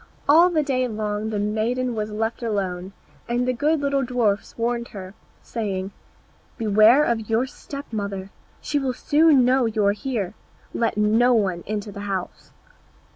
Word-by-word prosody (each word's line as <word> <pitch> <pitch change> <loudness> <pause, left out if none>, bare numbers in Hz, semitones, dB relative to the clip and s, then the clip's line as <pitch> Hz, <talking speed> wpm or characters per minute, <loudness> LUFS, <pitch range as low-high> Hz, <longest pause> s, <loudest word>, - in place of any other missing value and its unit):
All 330 +5 +7
the 315 -4 +1
day 255 -3 0
long 215 -1 -3
the 215 - -2
maiden 225 +5 -1
was 215 -1 -3
left 220 +3 -3
alone, 190 -5 -2 0.4
and 245 +1 0
the 255 - +2
good 295 +5 +1
little 280 -1 +1
dwarfs 235 -5 -1
warned 235 0 -1
her, 190 -3 -9 0.3
saying, 195 -4 -3 0.7
"Beware 220 +5 +5
of 225 -5 -1
your 225 +3 +2
step 280 +1 -9
mother, 200 -2 -4 0.3
she 295 - -1
will 265 -2 -1
soon 295 -4 +4
know 255 -1 +3
you 215 -2 0
are 200 - +5
here. 210 -4 -3 0.4
Let 230 -2 0
no 225 +4 +4
one 190 -6 0
into 210 0 -3
the 200 - -9
house." 190 -2 -5
225 Hz, 160 wpm, -23 LUFS, 205-255 Hz, 0.7 s, All